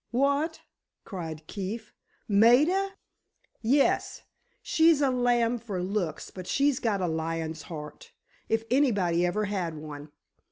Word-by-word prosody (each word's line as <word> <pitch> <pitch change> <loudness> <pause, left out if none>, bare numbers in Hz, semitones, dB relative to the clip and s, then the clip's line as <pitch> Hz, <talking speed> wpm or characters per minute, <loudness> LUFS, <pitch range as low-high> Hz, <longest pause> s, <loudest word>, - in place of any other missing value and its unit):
"What?" 280 +6 +1 0.4
cried 160 -6 -6
Keefe. 210 +4 -6 0.3
"Maida!" 290 - +4 0.7
"Yes; 270 +5 +2 0.4
she's 320 -2 +4
a 275 -2 +3
lamb 245 -1 +2
for 200 -6 -4
looks, 185 -5 -3
but 185 -1 -9
she's 280 -2 +2
got 210 -4 0
a 180 - +1
lion's 160 -1 -3
heart—if 225 - -6
anybody 200 -11 +2
ever 210 +4 0
had 185 -5 -2
one! 150 -1 -8
215 Hz, 115 wpm, -28 LUFS, 170-265 Hz, 0.7 s, Maida